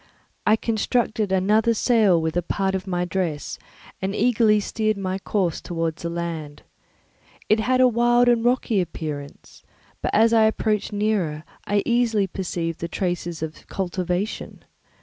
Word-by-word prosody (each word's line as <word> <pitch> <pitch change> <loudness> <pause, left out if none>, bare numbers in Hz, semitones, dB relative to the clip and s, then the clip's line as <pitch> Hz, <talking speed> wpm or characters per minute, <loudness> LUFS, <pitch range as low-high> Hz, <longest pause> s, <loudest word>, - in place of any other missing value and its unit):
I 215 - +6
constructed 220 -2 0
another 210 +5 +3
sail 215 -7 +4
with 160 0 -2
a 175 - +2
part 190 +2 -1
of 190 0 -3
my 180 -1 -1
dress 170 -4 -3 0.4
and 195 +1 -2
eagerly 220 -2 +3
steered 215 0 -1
my 190 -1 -3
course 190 -4 -1
towards 165 -2 -3
the 170 - -3
land. 165 -3 -5 0.9
It 215 - +4
had 255 +3 +1
a 255 - +7
wild 240 +1 +3
and 235 -1 +3
rocky 240 -4 +2
appearance, 150 -5 -7 0.4
but - - -1
as 225 +2 +4
I 220 -1 +5
approached 215 -1 0
nearer 205 -8 -1 0.2
I 205 0 +1
easily 235 -4 +2
perceived 170 -3 -4
the 170 - -3
traces 175 -2 -3
of 160 0 -7
cultivation. 185 +2 -3
195 Hz, 150 wpm, -23 LUFS, 170-220 Hz, 0.9 s, a